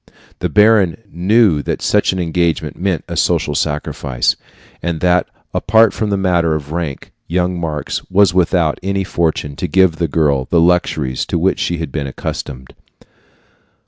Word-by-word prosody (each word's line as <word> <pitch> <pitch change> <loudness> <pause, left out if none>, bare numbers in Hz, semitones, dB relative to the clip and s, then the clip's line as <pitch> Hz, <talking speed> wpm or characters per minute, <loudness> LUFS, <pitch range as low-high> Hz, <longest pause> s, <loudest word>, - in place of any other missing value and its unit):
The - - -1
baron 105 -5 +4
knew 95 -2 +3
that - - -3
such 105 - +2
an 95 - -4
engagement 85 -1 -1
meant 90 -4 -2
a - - -5
social 75 - +1
sacrifice, 75 -4 -1 0.5
and 85 -1 -2
that, 90 0 +2 0.3
apart 110 +1 +3
from 110 - -2
the 100 - 0
matter 85 -4 +1
of 75 -1 -6
rank, 80 -5 -4 0.2
young 90 +1 -1
Marx 80 -3 -3
was 95 -1 +4
without 85 -3 +1
any 100 +1 -1
fortune 80 -5 -1
to 90 - -2
give 90 0 +3
the 85 - 0
girl 70 -4 +1
the 85 - +2
luxuries 80 -6 +1
to - - -1
which 95 +3 +1
she 85 - -1
had 80 -1 -5
been 70 -3 -3
accustomed. 65 -1 -6
85 Hz, 160 wpm, -17 LUFS, 75-95 Hz, 0.5 s, baron